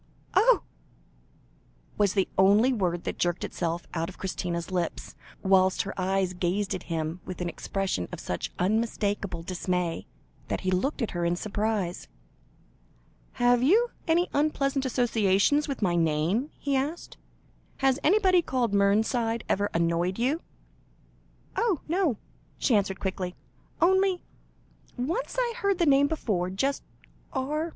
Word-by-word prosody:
"Oh!" - - +5 1.3
was 205 -2 +2
the 195 -2 +2
only 205 +7 +5
word 175 -6 -1
that - - -4
jerked 175 0 0
itself 170 0 -3
out 165 0 -2
of 185 - -12
Christina's 175 -2 -3
lips, 175 -3 -3 0.3
whilst 190 -1 +4
her 195 - -5
eyes 190 0 0
gazed 185 +3 -1
at - - -4
him 165 +1 -2
with 185 - -7
an 180 - -2
expression 185 - -2
of - - -6
such 90 - -4
unmistakable 205 -3 -1
dismay, 180 -1 -2 0.4
that - - -2
he 185 - 0
looked 240 +9 0
at 225 - -2
her 175 -1 -2
in 170 0 +1
surprise. 205 -2 -2 1.3
"Have 245 -1 +3
you 435 - +4 0.2
any 340 +2 +3
unpleasant 275 -2 +1
associations 240 +3 +2
with 275 -6 -3
my 175 -3 +2
name?" 165 - +1
he 280 -1 -1
asked. 290 +6 -3 0.6
"Has 270 0 +2
anybody 375 0 +4
called 250 -8 -1
Mernside 220 +3 +2
ever 205 +1 +1
annoyed 170 +2 0
you?" 270 +8 0 1.1
"Oh, 440 - +1
no!" 335 - +1 0.4
she 255 - +1
answered 195 -2 0
quickly. 185 -2 -3 0.4
"Only 380 +1 +3 0.7
once 335 - -2
I 480 -2 +1
heard 400 -5 +1
the 345 - +2
name 280 -1 +5
before 205 - -1
just 270 +9 -1 0.5
R. 300 +5 -1
205 Hz, 135 wpm, -27 LUFS, 180-280 Hz, 1.3 s, Oh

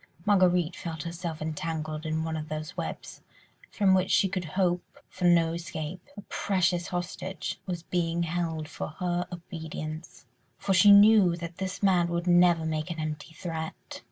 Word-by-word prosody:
Marguerite 180 -4 +3
felt 160 -3 -5
herself 170 -2 -5
entangled 155 0 -4
in 160 0 -1
one 160 0 -3
of 155 0 -5
those 155 +2 -5
webs, - - -6 0.5
from 195 -3 +3
which 185 0 +2
she 195 - +4
could 185 -1 -3
hope 180 -2 0
for 185 - -4
no 170 -2 +4
escape. 170 0 -5 0.2
A - - -6
precious 180 -3 0
hostage 180 0 -4
was 175 -3 -4
being 170 -1 -1
held 165 -2 -2
for 150 - -5
her 180 -1 -1
obedience: 160 -2 -7 0.3
for 195 - 0
she 190 +2 +7
knew 200 -3 +7
that 170 0 -7
this 190 +1 -4
man 180 -3 +4
would 170 0 -2
never 175 -2 +4
make 155 +1 -2
an 170 - -4
empty 155 +1 -5
threat. 160 -2 -6
170 Hz, 160 wpm, -28 LUFS, 160-180 Hz, 0.5 s, she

